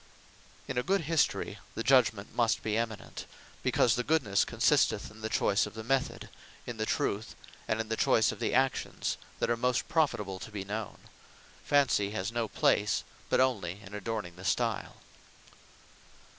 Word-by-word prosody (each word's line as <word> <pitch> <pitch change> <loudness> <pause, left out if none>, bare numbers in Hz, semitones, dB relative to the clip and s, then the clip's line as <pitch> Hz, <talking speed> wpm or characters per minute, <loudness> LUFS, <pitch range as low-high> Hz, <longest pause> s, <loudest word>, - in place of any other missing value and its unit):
In - - -1
a - - +2
good 195 +7 +1
History, 160 0 0 0.2
the 115 - -2
Judgement 115 -5 +3
must 115 -2 +1
be 110 -1 0
eminent; 115 -1 -4 0.3
because 120 - +3
the 125 - -1
goodnesse 135 -11 +2
consisteth, - - +2
in 110 +1 -14
the 110 0 0
Method, 135 +1 -1 0.4
in 120 - -6
the 110 0 -2
Truth, 105 +2 -1 0.3
and 110 - 0
in 110 - -2
the 110 - -1
Choyse 110 0 +3
of - - -9
the - - 0
actions 130 +1 0 0.2
that - - 0
are - - +3
most 125 +1 0
profitable 120 - 0
to - - -8
be 100 -3 -5
known. 105 +1 -4 0.7
Fancy 135 -8 +3
has 100 0 -3
no 115 -1 -1
place, 105 0 +2 0.3
but - - +3
onely 105 -8 +1
in 95 - -11
adorning 105 -4 -4
the 90 - -10
stile. - - 0
110 Hz, 155 wpm, -30 LUFS, 105-125 Hz, 0.7 s, Judgement